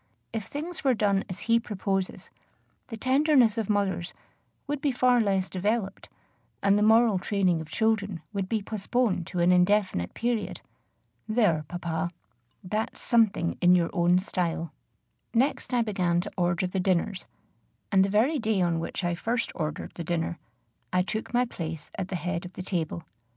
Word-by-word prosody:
If 220 -3 -3
things 320 +4 -6
were 265 -3 +3
done 200 -2 +2
as 185 - -6
he 230 0 +3
proposes, 195 -3 -3 0.6
the 225 - -7
tenderness 260 -2 +4
of 215 - -3
mothers 190 -4 0 0.5
would 290 -1 -3
be 285 - +2
far 250 -1 +3
less 195 -3 +1
developed, 200 +1 -2 0.5
and 200 0 +5
the 205 - +2
moral 220 -2 +5
training 185 -4 +1
of 160 - -9
children 205 -3 0
would 195 -2 -2
be 220 -3 0
postponed 215 -3 -1
to 180 - -4
an 175 +1 +5
indefinite 180 - +2
period. 235 -2 -2 0.7
There, 210 -9 +2
papa! 170 -1 -3 0.5
that's 215 +4 -3
something 220 -8 +2
in 180 0 +6
your 170 -2 +1
own 175 0 +4
style! 170 -3 -2 0.6
Next 265 +4 +1
I 245 -2 +3
began 180 -5 +1
to - - -7
order 175 0 +1
the 185 +1 -2
dinners; 185 +1 0 0.6
and 190 -2 +5
the 195 - 0
very 245 +10 +2
day 220 -3 +1
on 170 -2 +1
which 165 - -4
I 175 0 +1
first 230 +7 -1
ordered 155 -1 -4
the 170 - -6
dinner, 170 0 -2 0.5
I 180 0 +3
took 220 +3 -4
my 245 +1 +3
place 165 -8 -6
at 185 - -3
the 190 - -4
head 180 0 -2
of 180 0 -9
the 185 - -6
table. 170 -3 -2
195 Hz, 165 wpm, -27 LUFS, 175-225 Hz, 0.7 s, in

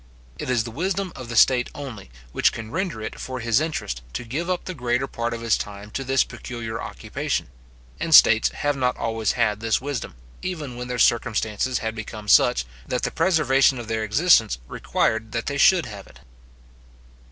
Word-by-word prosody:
It - - -4
is 120 -3 +2
the 115 - -7
wisdom 185 - -2
of 125 -3 -8
the 115 - -4
state 125 +2 +5
only, 125 - -8 0.2
which - - +3
can 110 -1 -8
render 165 - -3
it - - -6
for 130 -1 -5
his 115 +3 +2
interest 145 - -3
to - - -4
give 145 +10 -4
up 180 -1 -1
the 185 - -4
greater 125 -3 0
part 120 -3 -3
of 115 0 -5
his 115 -1 +2
time 105 0 -7
to 135 - -3
this 135 0 +3
peculiar 115 -2 -6
occupation; - - -3 0.5
and 160 - +4
states 110 0 +7
have 145 0 -1
not 125 -2 0
always 115 -2 -1
had 105 -4 +1
this 115 0 +1
wisdom, 135 - -5 0.3
even 155 -9 -5
when 125 0 -6
their 125 0 -3
circumstances 115 +1 +1
had 110 - -1
become 110 -1 -8
such, - - +5 0.2
that 125 - -2
the - - 0
preservation 150 -6 +3
of 120 -2 -7
their 110 -1 -1
existence 110 - +4
required 110 - -1
that 115 -1 -2
they 140 0 -2
should 175 0 +5
have 100 -4 -9
it. 65 - -18
120 Hz, 190 wpm, -23 LUFS, 110-140 Hz, 0.5 s, states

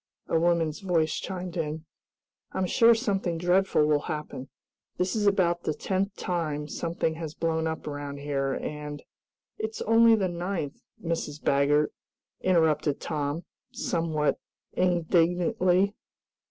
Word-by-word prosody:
a 165 - +2
woman's 165 -2 +1
voice 170 -5 +1
chimed 185 -2 -5
in. 160 -1 -3 0.7
"I'm 190 - 0
sure 230 +5 +5
something 195 -7 -1
dreadful 180 -2 +3
will 150 -1 +3
happen! 150 -4 -5 0.5
This 180 +3 0
is 210 -2 +1
about 175 -4 +2
the 155 - -2
tenth 195 +1 -1
time 155 -5 -2
something 165 +1 -2
has 160 -2 -6
blown 160 -1 0
up 160 0 -4
around 145 -1 -5
here, 140 -1 -1
and 150 0 -5 0.3
" - - -62
"It's 440 +1 -3
only 230 - +6
the 195 -4 +1
ninth, 175 -4 -4 0.2
Mrs. 165 -3 -2
Baggert," 145 +2 +2 0.5
interrupted 160 -5 +2
Tom, 150 +1 -3 0.3
somewhat 165 - 0 0.3
indignantly. 180 +3 +2
165 Hz, 125 wpm, -27 LUFS, 150-185 Hz, 0.7 s, only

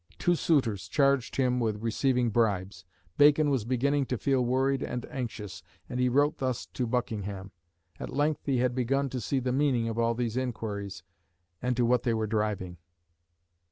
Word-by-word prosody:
Two 175 - +2
suitors 130 - +1
charged 140 -3 +2
him 125 -2 +1
with 110 -2 -1
receiving 125 +1 +1
bribes. 100 -5 0 0.3
Bacon 145 0 +6
was 130 -6 0
beginning 135 +3 +1
to 125 - -1
feel 135 +1 +1
worried 130 +2 +1
and 125 - -4
anxious, 105 -8 -5 0.3
and 125 - -4
he 125 0 +3
wrote 145 +4 +2
thus 130 -3 -2
to 125 - -3
Buckingham. 105 -5 -3 0.5
At - - -5
length 145 +3 -1
he 135 -2 +2
had 125 0 +1
begun 135 +2 0
to 125 -1 -4
see 135 - -1
the 125 0 -1
meaning 130 -4 +2
of 115 0 -3
all 115 0 +2
these 120 -1 -2
inquiries, 100 -7 -4 0.6
and 125 -1 -1
to 120 - +3
what 120 0 +3
they 115 -2 0
were 110 0 0
driving. 105 -5 -2
125 Hz, 175 wpm, -29 LUFS, 110-135 Hz, 0.6 s, Bacon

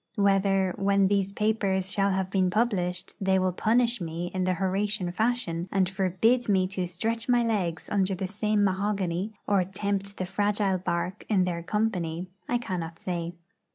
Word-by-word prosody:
Whether, 195 -2 +2
when 195 -1 +3
these 200 -1 +1
papers 200 -3 0
shall 200 0 +2
have 190 -1 -1
been 185 -2 +2
published, 185 -4 0
they 190 0 +3
will 185 0 +2
punish 235 +4 +2
me 170 +1 -4
in 185 -1 0
the 185 0 +1
Horatian 195 0 -1
fashion, 190 -5 -1
and 190 -2 +2
forbid 195 +6 +1
me 190 -2 +4
to 185 -2 -2
stretch 225 +7 -3
my 245 -1 +4
legs 185 -7 -1
under 195 -1 +1
the 185 +1 -3
same 210 +1 0
mahogany, 195 0 0
or 200 -2 +3
tempt 200 +1 -3
the 185 - -2
fragile 200 0 0
bark 175 0 -2
in 195 -4 +3
their 175 -2 -2
company, 180 -4 -1 0.2
I 245 - +2
cannot 170 -8 -4
say. 170 -1 -3
195 Hz, 165 wpm, -27 LUFS, 180-205 Hz, 0.2 s, me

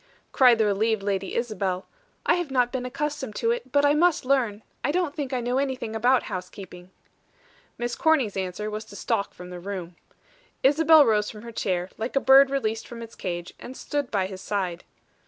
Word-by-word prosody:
cried 250 -3 +6
the 220 - +3
relieved 210 +1 +1
Lady 195 -1 -2
Isabel. 195 -6 -2 0.4
"I - - +4
have 350 -4 -1
not 250 -2 +2
been 250 -1 -3
accustomed 280 -4 -4
to 230 - +1
it, 240 +2 -4
but 285 +1 +3
I 290 - +5
must 330 -2 +2
learn. 240 -6 +1 0.2
I 290 - +1
don't 345 -3 0
think 285 -4 -4
I 255 -2 -1
know 245 +2 0
anything 260 -5 -3
about 245 +3 +3
housekeeping." 180 -1 -8 0.9
Miss 240 0 -3
Corny's 285 -10 +2
answer 190 +3 -3
was 215 +1 -4
to 200 - -13
stalk 200 - -1
from 180 0 -10
the 180 - -7
room. 180 -2 -6 0.7
Isabel 310 +2 +6
rose 210 -2 +2
from 210 0 -10
her 235 - -8
chair, 185 -4 -2
like 225 +5 -4
a - - +5
bird 270 0 +7
released 225 -5 -2
from 235 -1 -8
its 230 - -11
cage, 175 -1 -5
and 260 - -9
stood 290 -3 -3
by 195 -3 0
his 190 0 -7
side. 185 -4 -3
230 Hz, 195 wpm, -25 LUFS, 200-270 Hz, 0.9 s, bird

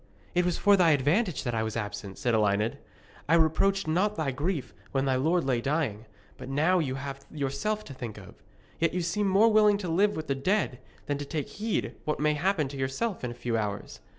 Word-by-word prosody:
'It 180 - +3
was 175 -1 0
for 205 0 +5
thy 180 -4 +5
advantage 155 - +1
that 120 - -2
I 110 - 0
was 110 0 -3
absent,' 105 -2 -5
said 120 - 0
Elined. 105 +4 +1 0.5
'I 165 - +6
reproached 170 +5 +2
not 190 +7 +1
thy 155 -4 -1
grief 145 0 -2 0.2
when 135 0 +1
thy 135 -1 +2
lord 160 +6 +2
lay 125 -3 +1
dying, 135 -7 -1 0.3
but - - -8
now 160 +7 +3
you 135 -5 -1
have 135 0 -6
yourself 150 +10 -2
to 140 - -9
think 120 -5 -7
of. 95 -2 -11 0.5
Yet 165 +1 +1
you 180 - +1
seem 200 +5 0
more 200 +4 +5
willing 210 -1 +5
to 195 -3 -5
live 200 +5 +2
with 155 - -4
the 140 - 0
dead 135 - 0 0.3
than 145 -1 -2
to 145 - -4
take 150 0 -3
heed 215 +1 -2
what 150 - -2
may 150 +1 +3
happen 160 -1 +1
to 140 - -7
yourself 135 - -2
in 125 - -1
a 120 - -7
few 120 -1 -2
hours. 105 -2 -3
150 Hz, 220 wpm, -28 LUFS, 130-180 Hz, 0.5 s, I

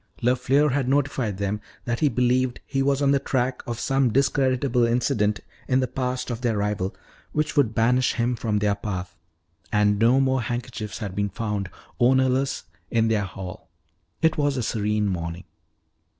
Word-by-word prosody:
LeFleur 130 +4 +3
had 130 -1 0
notified 135 -7 0
them 100 +1 -2 0.2
that 120 -1 -1
he 150 - +3
believed 125 0 +1
he 135 -1 -1
was 140 +1 +2
on 140 - +4
the 140 - +3
track 130 -2 -1
of 120 -1 -3
some 135 -1 +2
discreditable 130 -1 +2
incident 115 -3 +1 0.3
in 130 0 +3
the 130 - +1
past 125 0 -3
of 120 0 -4
their 115 -4 0
rival 100 -2 -1 0.4
which 150 0 -1
would 125 -7 +2
banish 125 +3 +3
him 120 +1 0
from 110 -2 -1
their 105 0 +2
path. 95 -3 -5 0.6
And 105 -1 +3
no 120 +4 +5
more 130 -1 +2
handkerchiefs 120 -3 -4
had 100 -4 -5
been 100 +1 -1
found, 105 -2 -3 0.3
ownerless, 130 +2 +2 0.3
in 115 -1 +2
their 105 -3 +1
hall. 95 -2 -8 0.5
It 160 -1 +3
was 145 -2 +1
a 125 - -1
serene 105 -1 0
morning. 85 -1 -3
120 Hz, 165 wpm, -24 LUFS, 105-130 Hz, 0.6 s, no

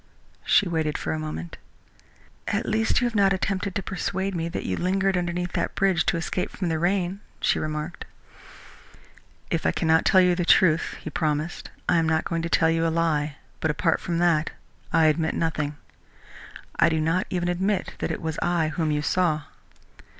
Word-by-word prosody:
She 205 - +4
waited 160 -3 -1
for 80 - -3
a 80 - -3
moment. 80 +2 -6 0.9
"At - - -1
least 220 +1 +1
you - - +2
have 240 - -1
not 200 -2 +4
attempted 195 0 -2
to 200 - -2
persuade 190 +1 -2
me 165 -1 -2
that - - -4
you 95 - -1
lingered 190 - +1
underneath 175 0 -2
that - - -2
bridge 190 -2 +2
to - - +2
escape 175 +2 -2
from 180 -3 -3
the 160 -1 0
rain," 185 +2 0 0.2
she - - +1
remarked. 155 +2 -4 1.5
"If 165 - 0
I - - +2
cannot 160 0 +2
tell 190 - +5
you 180 -1 +5
the 175 0 -1
truth," 165 -2 +4
he 155 - -6
promised, 155 +1 -2 0.2
"I 175 - +3
am 165 -1 +2
not 160 0 +1
going 165 -1 -1
to 165 - -3
tell 160 -1 +3
you 165 0 +1
a - - +2
lie, 155 -3 0 0.2
but 160 - 0
apart 165 +2 +1
from 170 -1 -2
that 165 -3 +2 0.4
I 165 -1 +4
admit 160 +1 +2
nothing. 150 -3 -1 1.0
I 170 - +6
do 160 -1 0
not 165 +4 0
even 175 -1 -1
admit 190 +2 -1
that - - -2
it - - -4
was 160 -1 -3
I 170 -3 +1
whom 160 0 -1
you 150 0 0
saw." 155 -3 +1
165 Hz, 190 wpm, -25 LUFS, 155-180 Hz, 1.5 s, I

